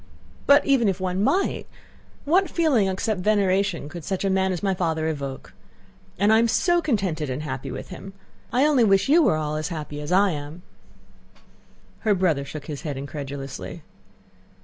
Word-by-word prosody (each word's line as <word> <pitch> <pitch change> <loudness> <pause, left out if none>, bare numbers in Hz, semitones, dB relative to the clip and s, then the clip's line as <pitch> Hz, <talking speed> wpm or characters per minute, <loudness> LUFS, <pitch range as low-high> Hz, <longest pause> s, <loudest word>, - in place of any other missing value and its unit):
But 285 +1 +6
even 265 -5 +3
if 190 -1 -2
one 185 +1 -1
might, 380 - 0 0.6
what 365 +6 +3
feeling 285 - +2
except 195 +2 -1
veneration 195 -5 +1
could 170 +2 -8
such 190 +2 -2
a 195 - +1
man 190 0 +1
as 180 0 -4
my 195 -1 +2
father 160 -3 -1
evoke? 140 -4 -5 0.6
And 205 +3 +4
I 220 - +6
am 230 - +3
so 345 - +2
contented 190 - -1
and 130 +4 -3
happy 130 -3 -5
with - - -7
him. 195 +1 -9 0.4
I 255 +5 +3
only 290 -5 +4
wish 195 +3 +3
you 330 +4 +6
were 285 - +3
all 155 0 -2
as 155 -1 -2
happy 150 -2 -6
as 150 - -6
I 195 +1 +4
am." 150 +3 -7 1.4
Her 210 -2 +2
brother 170 -7 +1
shook 145 +1 -8
his 145 -2 -6
head 145 -4 -4
incredulously. 140 -1 -7
185 Hz, 175 wpm, -24 LUFS, 150-215 Hz, 1.4 s, But